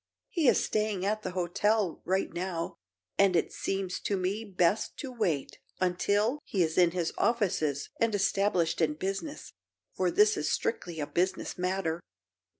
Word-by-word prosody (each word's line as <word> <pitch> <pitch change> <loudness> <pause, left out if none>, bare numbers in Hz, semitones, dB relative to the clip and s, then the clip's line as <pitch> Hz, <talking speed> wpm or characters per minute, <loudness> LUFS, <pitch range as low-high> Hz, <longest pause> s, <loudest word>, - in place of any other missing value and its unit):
He 330 - +2
is - - +5
staying 210 -3 0
at 215 +1 0
the 185 - -3
hotel, 190 +2 +1
right 190 +1 0
now, 170 -2 -3 0.4
and 195 -2 +5
it 165 - +1
seems 195 -2 -2
to 200 - -1
me 190 +4 -1
best 190 -1 +1
to 270 -3 -5
wait 175 - -1 0.2
until 205 +8 +1
he 190 -4 +1
is 160 -1 -1
in 175 -2 +6
his 170 -1 -2
offices 170 - +1
and 230 -2 +2
established 195 -4 +1
in 150 -2 +2
business, 195 - -4 0.4
for - - +1
this 425 +1 +4
is - - 0
strictly 450 - -2
a 150 - -1
business 185 +5 -1
matter." 180 -2 -1
190 Hz, 155 wpm, -30 LUFS, 175-215 Hz, 0.4 s, in